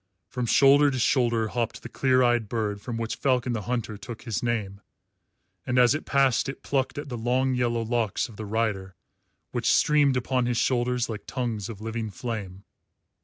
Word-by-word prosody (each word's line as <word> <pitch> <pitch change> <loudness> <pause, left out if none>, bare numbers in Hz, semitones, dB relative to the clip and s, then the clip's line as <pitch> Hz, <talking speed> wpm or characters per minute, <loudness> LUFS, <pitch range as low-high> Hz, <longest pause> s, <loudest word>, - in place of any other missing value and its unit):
From 125 -2 -3
shoulder 140 +4 +6
to 130 - -2
shoulder 120 -3 +2
hopped 120 -1 -3
the - - -6
clear 130 -1 +2
eyed 120 -3 +2
bird 105 -3 -2
from 120 0 -5
which 115 -1 -3
Falcon 125 -2 +1
the 110 - -2
Hunter 115 -1 -3
took 110 +2 -9
his 115 -5 -3
name, 105 -5 -2 0.8
and 130 -1 -1
as 125 -1 +6
it 155 - -4
passed 135 -2 +2
it 135 - -8
plucked 135 -1 -1
at 145 - -5
the 120 - -4
long 130 +3 +1
yellow 120 -2 0
locks 115 -2 -1
of 115 - -14
the 110 0 -7
rider, 100 -3 -2 0.6
which - - +1
streamed 145 -3 +4
upon 125 0 0
his 120 -1 0
shoulders 125 -1 +1
like 110 -2 -7
tongues 115 -5 -3
of 105 -3 -8
living 110 0 -4
flame. 100 -4 -6
120 Hz, 185 wpm, -26 LUFS, 110-130 Hz, 0.8 s, shoulder